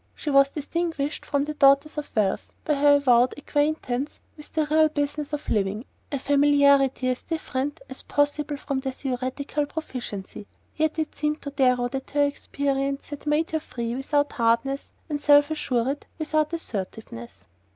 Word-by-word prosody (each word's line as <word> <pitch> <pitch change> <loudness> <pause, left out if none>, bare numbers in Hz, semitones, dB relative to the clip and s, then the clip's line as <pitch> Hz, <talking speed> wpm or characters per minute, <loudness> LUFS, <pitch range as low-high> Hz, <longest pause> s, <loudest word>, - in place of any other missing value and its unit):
She 300 - -3
was 275 0 +6
distinguished 300 0 -3
from 285 -1 +1
the 305 - -4
daughters 280 +1 +4
of 300 -1 -5
wealth 205 -3 0
by 305 - +2
her 290 0 +5
avowed 255 -3 +4
acquaintance 290 -2 -1 0.2
with 300 -1 -13
the 315 -1 +1
real 310 +1 +4
business 290 0 -2
of 295 0 -4
living, 210 +2 0 0.3
a 280 - 0
familiarity 280 -1 +4
as 255 - -1
different 290 -2 -3
as 265 -1 -8
possible 290 0 0
from 275 -1 -3
their 265 0 -3
theoretical 265 +3 -3
proficiency; 240 -10 -6 0.3
yet 315 +1 0
it 315 -1 -2
seemed 300 0 -2
to 285 - -5
Darrow 250 -3 +2
that 265 +1 -5
her 290 0 +2
experience 275 -1 -2
had 290 0 -8
made 300 +2 +1
her 315 - 0
free 235 -5 -4
without 290 +2 0
hardness 235 +4 +1 0.2
and 295 -3 -3
self 290 +1 +5
assured 270 -2 -1
without 310 -1 0
assertiveness. 185 - -6
285 Hz, 160 wpm, -25 LUFS, 260-300 Hz, 0.3 s, was